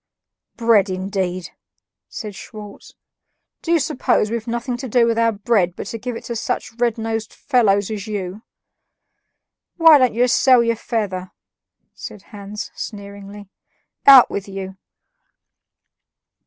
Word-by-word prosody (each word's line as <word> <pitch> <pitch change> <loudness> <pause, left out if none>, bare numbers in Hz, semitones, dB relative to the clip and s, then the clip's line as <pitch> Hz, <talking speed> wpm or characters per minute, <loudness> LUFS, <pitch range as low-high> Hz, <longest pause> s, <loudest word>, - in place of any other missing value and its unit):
"Bread, 225 -4 +3
indeed!" 185 -1 -3 0.6
said 210 -3 -7
Schwartz; 210 +1 -11 0.7
"do 335 - -3
you 340 - +5
suppose 235 -5 0
we've 230 0 -4
nothing 240 +1 -3
to 260 +1 -6
do 235 +1 +3
with 230 0 0
our 230 0 +3
bread 200 -4 0
but - - -6
to 225 +3 -6
give 245 +1 -5
it - - -8
to 235 - -5
such 220 0 -3
red 240 -2 +1
nosed 225 -1 -3
fellows 210 -6 +1
as 210 -1 -5
you?" 200 -1 -5 1.4
"Why 325 -3 +7
don't 255 -4 +2
you 245 +2 +3
sell 255 -1 +4
your 230 0 +1
feather?" 200 -6 -3 0.6
said 205 - -10
Hans 205 +1 -7
sneeringly. 200 0 -9 0.6
"Out 270 -3 +9
with 200 0 -4
you!" 190 -1 -7
215 Hz, 135 wpm, -20 LUFS, 200-235 Hz, 1.4 s, Out